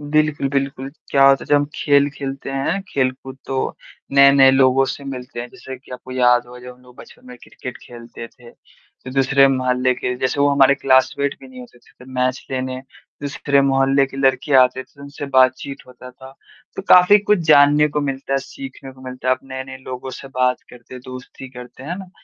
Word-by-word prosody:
बिल्कुल, 150 -1 0
बिल्कुल। 135 -1 -3 0.2
क्या 135 -1 +4
होता 135 0 +4
है - - -17
जब 145 - +2
हम 145 0 +3
खेल 145 -1 +2
खेलते 135 -1 -7
हैं, 135 +8 -2
खेल-कूद, 130 0 -3
तो 135 -1 -3 0.4
नए-नए 140 -1 +7
लोगों 135 0 +3
से 140 - -10
मिलते 125 -2 -7
हैं। 120 - -7
जैसे 130 +1 -10
कि 135 - -22
आपको 130 0 -10
याद 125 -1 +3
होगा 125 0 -12
जब 125 0 -11
हम 125 - -25
लोग 125 -1 -19
बचपन - - -16
में 125 0 -11
क्रिकेट 125 -1 -9
खेलते 120 -1 -11
थे, 120 -1 -17
तो 130 - -17
दूसरे 135 +1 +3
मोहल्ले 130 -1 0
के 125 0 -3
जैसे 130 +3 -2
वो 145 - +4
हमारे 140 0 +4
क्लासमेट 135 +1 +1
भी 135 - -13
नहीं 130 -1 -12
होते 120 0 -14
थे। - - -26
तो 130 - -15
मैच 130 +1 -2
लेने, 130 0 -3 0.4
दूसरे 140 0 0
मोहल्ले 135 0 +2
के 135 - -12
लड़के 135 +1 0
आते 125 +1 0
थे, - - -29
तो 140 - -15
उनसे 140 0 -8
बातचीत 130 +1 +1
होता 125 0 -13
था। 130 +1 -15 0.4
तो - - -5
काफ़ी 180 +3 +7
कुछ 210 0 +1
जानने 145 +1 +5
को 150 0 -2
मिलता 135 -1 -4
है, 135 - +2
सीखने 135 - -10
को 130 - -19
मिलता 130 0 -6
है। 130 - +4
आप - - -19
नए-नए 130 0 -8
लोगों 130 0 -8
से 135 - -11
बात 125 -1 0
करते 125 +1 -14
हैं, 125 - -9
दोस्ती 130 +1 -10
करते 125 0 -12
हैं। 150 - -8
है 180 - -4
ना? 190 -2 -11
135 Hz, 215 wpm, -19 LUFS, 130-140 Hz, 0.4 s, नए-नए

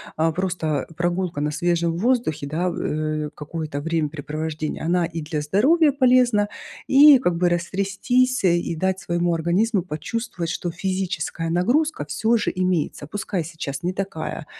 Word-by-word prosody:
а, 160 +1 +2
просто 175 -4 -2
прогулка 175 -2 -1
на 150 0 0
свежем 170 +1 0
воздухе, 230 - 0
да, 170 +5 -1
э, 155 -1 -2
какое-то 150 -1 -5
времяпрепровождение, 155 -1 -3
она 175 +2 +2
и 165 0 -5
для 150 0 -3
здоровья 275 - +3
полезна, 250 -6 +3 0.4
и 280 +1 +8
как 180 -8 0
бы 175 +1 +2
растрястись, 200 +8 0
а, - - +6
и 170 -1 +1
дать 190 +3 0
своему 175 0 0
организму 180 +6 +1
почувствовать, 170 +2 -4
что 175 - -3
физическая 175 -2 -3
нагрузка 245 - +1
всё 220 +11 +1
же - - 0
имеется. 180 -5 -1
Пускай 190 -1 -3
сейчас 150 -3 -6
не 180 - 0
такая, 185 -5 -4
175 Hz, 145 wpm, -23 LUFS, 155-200 Hz, 0.4 s, и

